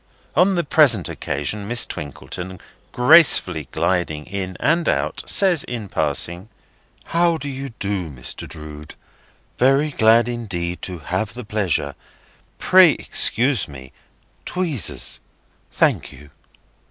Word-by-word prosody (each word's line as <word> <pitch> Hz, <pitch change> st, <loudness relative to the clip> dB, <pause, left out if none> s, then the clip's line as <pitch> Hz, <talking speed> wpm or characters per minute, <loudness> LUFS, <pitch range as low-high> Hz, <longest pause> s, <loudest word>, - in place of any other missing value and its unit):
On 185 Hz, +5 st, +3 dB
the 175 Hz, -, 0 dB
present 140 Hz, -, +3 dB
occasion 75 Hz, +9 st, -4 dB
Miss 120 Hz, +2 st, +3 dB
Twinkleton, 90 Hz, +5 st, -8 dB, 0.3 s
gracefully 125 Hz, -, +4 dB
gliding 85 Hz, -5 st, -2 dB
in 95 Hz, -1 st, -6 dB
and 165 Hz, +2 st, +1 dB
out, 75 Hz, +1 st, -2 dB
says 185 Hz, -6 st, +3 dB
in 115 Hz, -5 st, -6 dB
passing: 90 Hz, +5 st, -1 dB, 0.5 s
"How 170 Hz, 0 st, +1 dB
do 145 Hz, -, -7 dB
you 135 Hz, 0 st, -6 dB
do, 100 Hz, -4 st, -3 dB
Mr. 65 Hz, -4 st, -5 dB
Drood? 75 Hz, 0 st, -9 dB, 0.6 s
Very 135 Hz, +4 st, +2 dB
glad 115 Hz, -2 st, +3 dB
indeed 95 Hz, -8 st, -4 dB
to 90 Hz, -2 st, -4 dB
have 95 Hz, +8 st, -4 dB
the 125 Hz, -2 st, -8 dB
pleasure. 95 Hz, -9 st, -1 dB, 0.6 s
Pray 185 Hz, -5 st, +5 dB
excuse 125 Hz, 0 st, +2 dB
me. 65 Hz, -3 st, -12 dB, 0.5 s
Tweezers. 170 Hz, -, 0 dB, 0.5 s
Thank -, -, 0 dB
you!" 70 Hz, +1 st, -16 dB
105 Hz, 115 wpm, -20 LUFS, 85-140 Hz, 0.6 s, Pray